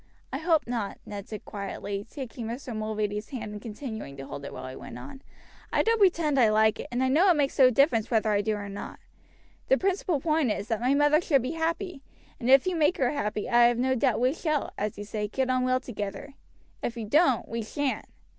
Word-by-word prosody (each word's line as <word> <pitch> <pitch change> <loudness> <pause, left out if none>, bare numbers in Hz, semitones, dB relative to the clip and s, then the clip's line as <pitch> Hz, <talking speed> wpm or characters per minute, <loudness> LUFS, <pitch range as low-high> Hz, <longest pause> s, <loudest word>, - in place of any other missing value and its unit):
"I 270 - -1
hope 320 -1 +2
not," 230 -4 -3
Ned 200 -1 -7
said 215 - -7
quietly, 200 0 -5
taking 250 -4 -6
Mr. 240 0 -5
Mulready's 215 -1 -2
hand 220 -6 -5
and 210 -1 -7
continuing 220 - -7
to 135 - -7
hold 140 - -7
it 140 - -6
while - - -7
he 130 - -7
went 120 - -9
on: 135 - -10 0.5
"I - - +3
don't 455 0 +2
pretend 330 -8 +3
I 230 -3 +6
like 215 0 +3
it, - - -5
and 245 +2 0
I - - +3
know 320 +9 +4
it 350 - +5
makes 285 -2 0
no 260 -1 +8
difference 245 -3 +3
whether 220 -2 +2
I 205 -1 +2
do 215 +1 0
or 205 -1 -5
not; 200 0 -7 0.7
the - - +4
principal 375 -5 0
point 310 -3 +1
is, 205 +1 -4
that 225 -1 -1
my 255 +3 +3
mother 295 +2 +4
should 275 -7 +2
be 255 - -2
happy, 330 0 -2 0.4
and 240 -1 -2
if 270 0 +7
you 370 -1 0
make 320 +1 +2
her 250 -3 +2
happy 210 -7 -2
I 240 0 +5
have 240 0 +3
no 260 +2 +2
doubt 255 -2 +1
we 255 +3 +2
shall, 310 -3 -1
as 210 0 -3
you 205 - -5
say, 210 0 -3
get 260 +4 -1
on 255 0 +1
well 255 0 +2
together; 235 +1 -6 0.5
if 240 - -3
you 225 - -4
don't, 265 +1 +3
we 230 0 -3
shan't." 270 +5 -2
245 Hz, 230 wpm, -27 LUFS, 215-290 Hz, 0.7 s, no